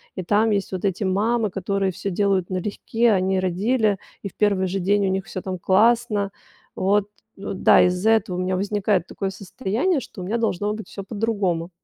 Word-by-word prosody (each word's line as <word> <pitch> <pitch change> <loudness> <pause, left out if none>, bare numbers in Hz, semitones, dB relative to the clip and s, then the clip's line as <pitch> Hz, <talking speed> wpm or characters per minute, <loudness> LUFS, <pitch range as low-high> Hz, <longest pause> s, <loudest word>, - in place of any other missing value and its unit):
и 185 - -4
там 210 +5 +2
есть 200 -2 -1
вот 185 +1 -3
эти 195 +1 -1
мамы, 210 +3 +1
которые 195 0 -1
всё 185 +2 -4
делают 195 -1 +1
налегке. 210 +5 0
Они 190 -1 +1
родили, 200 +3 +1 0.2
и 200 - -3
в - - -27
первый 200 -3 +2
же 190 +2 -2
день 200 +2 +2
у - - +1
них 190 0 -2
всё, 185 - -6
там, 185 -1 -4
классно. 210 +1 +2 0.4
Вот, 200 +2 +2 0.3
у, 200 - -5
да, 190 - +5
из-за 180 +4 +2
этого 220 -5 +1
у - - -2
меня 185 +1 0
возникает 200 -2 0
такое 195 - -3
состояние, 220 - -1
что 205 - -10
у - - -5
меня 220 +5 -1
должно 210 -2 0
быть 220 0 -7
всё 200 - -7
по-другому. 200 -5 -1
195 Hz, 200 wpm, -23 LUFS, 185-215 Hz, 0.4 s, да